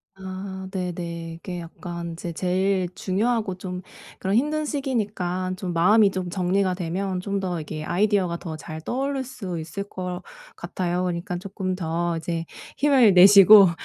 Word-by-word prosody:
아 190 0 -7
네네. 170 -3 -4
이게 175 0 -6
약간 170 +1 -7
인제 170 0 -6
제일 185 +1 0
중요하고 210 +1 0
좀 180 -1 -5 0.4
그런 195 +2 0
힘든 300 +5 +1
시기니까 210 - -2
좀 185 -1 -4
마음이 200 +4 +5
좀 185 -1 -3
정리가 185 +1 +1
되면 185 +2 -2
좀 200 +1 -2
더 180 -4 -2
이게 155 0 -6
아이디어가 190 -1 +1
더 160 -3 -6
잘 160 0 -8
떠오를 270 - -2
수 200 -10 -6
있을 185 +5 -5
것 180 -2 -5 0.4
같아요. 180 0 -2
그러니까 175 0 -2
쪼끔 190 0 -4
더 170 -1 -1
이제 165 0 -3 0.3
힘을 265 -7 +5
내시고 195 +1 +9
185 Hz, 300 characters per minute, -24 LUFS, 175-200 Hz, 0.4 s, 내시고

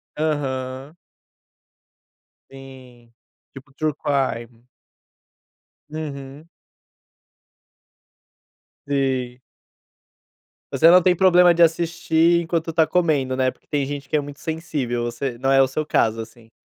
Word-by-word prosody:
Aham. 135 -1 -3 1.5
Sim, 130 -3 -15 0.4
tipo 135 +1 -14
true 155 +2 -1
crime. 125 -5 -3 1.2
Uhum. 145 -1 -8 2.4
Sim. 130 -3 -2 1.3
Você 165 - +5
não 180 +1 +7
tem 180 +1 +3
problema 180 -1 +5
de 170 0 +4
assistir 165 0 +2
enquanto 165 0 -2
está 160 0 +3
comendo, 155 -6 0
né, 130 -1 +2
porque - - -28
tem 145 -2 -1
gente 140 0 -7
que - - +1
é - - +1
muito 145 0 -10
sensível 145 -7 -3
você, 120 +1 -4
não 135 +2 -1
é 135 0 +5
o 135 - +3
seu 155 +4 -3
caso 115 -6 +1
assim. 115 0 -11
140 Hz, 110 wpm, -22 LUFS, 130-160 Hz, 2.4 s, não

